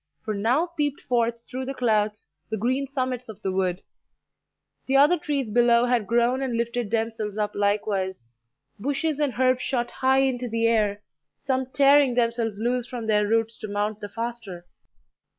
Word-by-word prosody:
for 215 - -1
now 235 +11 +1
peeped 295 -5 -2
forth 235 -1 0
through 260 +1 -5
the 270 +1 -5
clouds 215 - 0 0.2
the 220 - -2
green 255 +6 0
summits 255 -3 -3
of 210 -2 -9
the 190 - 0
wood; 185 -1 -1 1.0
the 270 +1 +3
other 290 +5 +6
trees 280 -7 -2
below 240 +1 +4
had 240 -4 +1
grown 240 +3 +2
and 250 -3 -1
lifted 235 -1 -2
themselves 220 -2 -2
up 210 -1 -1
likewise; 200 - -1 0.5
bushes 285 +5 -1
and 285 -6 0
herbs 255 0 +3
shot 240 -3 -1
high 265 +1 +2
into 250 -2 -1
the 230 0 0
air, 210 -3 +1 0.3
some 260 -1 -1
tearing 275 -1 +4
themselves 230 -3 0
loose 240 +2 -1
from 240 -3 -6
their 210 -1 +2
roots 225 +1 0
to 215 - -6
mount 205 +1 -2
the 205 - -7
faster. 225 -7 -6
235 Hz, 170 wpm, -25 LUFS, 215-260 Hz, 1.0 s, other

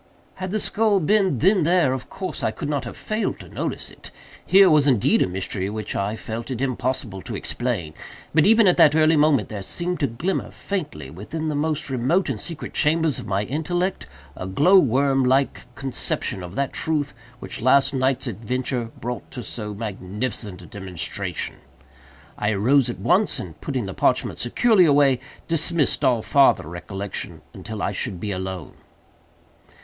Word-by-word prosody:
Had 185 0 -4
the 215 +3 -1
skull 215 -1 +2
been 190 -3 +2
then 190 - +4
there, 165 -4 +3
of 130 -1 -6
course 185 -2 -5
I - - +1
could 150 - -5
not 145 -3 -1
have 115 - -7
failed 215 +1 -2
to - - -11
notice - - -4
it. - - -13 0.3
Here 195 0 +6
was 150 -4 +4
indeed 125 -7 +3
a - - +3
mystery 95 +1 -2
which 110 0 -5
I 100 +2 -1
felt 115 +2 -6
it 125 -3 -3
impossible 125 -6 -2
to - - -6
explain; 110 -11 -3 0.4
but, 155 0 +5
even 225 +3 +6
at 180 - +4
that 155 -3 +6
early 160 0 +5
moment, 145 -6 +3
there 105 -2 -5
seemed 175 - -3
to 140 - +2
glimmer, 145 +11 -2
faintly, 145 - -5
within 155 - -5
the 150 - -2
most 155 -1 -1
remote 135 +9 +1
and 120 -6 -2
secret 165 +7 -5
chambers 160 -2 +2
of - - -8
my 100 +1 0
intellect, 175 - -2 0.3
a 95 - -6
glow 165 - +5
worm 135 -1 +2
like 130 +2 +1
conception 130 -7 -2
of 90 +1 -8
that 140 -1 -1
truth 150 -3 -1 0.3
which - - -6
last 135 +2 +4
night's 130 0 +1
adventure 120 +2 -2
brought 120 +1 -5
to 125 - -7
so 105 -2 -5
magnificent 105 -1 -5
a - - -11
demonstration. 95 -7 -3 0.8
I 105 +1 +1
arose 125 +6 +3
at 120 - -4
once, 180 - +2
and - - -9
putting 130 -8 -2
the 95 - -5
parchment - - +1
securely 195 - +4
away, 140 -4 +4 0.3
dismissed 165 -2 +1
all 120 -4 +3
farther 135 - +4
reflection 95 +4 -6
until 110 -2 -6
I - - 0
should 95 -1 -3
be 105 +3 -3
alone. 95 -3 -5
130 Hz, 175 wpm, -23 LUFS, 105-160 Hz, 0.8 s, Here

